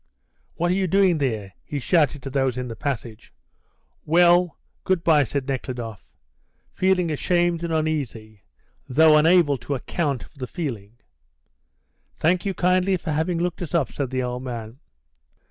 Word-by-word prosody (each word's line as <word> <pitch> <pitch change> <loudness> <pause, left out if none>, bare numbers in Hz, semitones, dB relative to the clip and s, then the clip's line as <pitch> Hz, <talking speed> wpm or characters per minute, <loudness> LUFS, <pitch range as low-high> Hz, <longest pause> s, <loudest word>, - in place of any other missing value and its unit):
"What 175 +1 0
are - - +3
you 190 0 +1
doing 185 -2 +3
there?" 110 -8 -2
he 145 - -5
shouted 145 -1 +1
to 135 - -6
those 135 -2 0
in 125 -1 -4
the 115 - -6
passage. 115 - -5 0.7
"Well, 175 0 +4 0.3
good 185 -3 0
bye," 155 -3 +5
said 140 +1 -3
Nekhludoff, 120 -7 -5 0.7
feeling 185 -3 +1
ashamed 175 +2 +1
and 170 - -3
uneasy, 135 -10 -3 0.5
though 155 +4 +6
unable 155 -3 +4
to 130 +4 -3
account 140 -1 -2
for 140 - -18
the 125 - -4
feeling. 115 - -5 1.2
"Thank 175 +4 +1
you 195 - -2
kindly 185 +1 +2
for 160 - -5
having 160 +3 0
looked 175 +1 -2
us 170 -2 -4
up," 160 -6 +1
said 140 -3 -3
the 130 0 -2
old 125 0 -3
man. 120 -1 -7
150 Hz, 155 wpm, -23 LUFS, 125-175 Hz, 1.2 s, though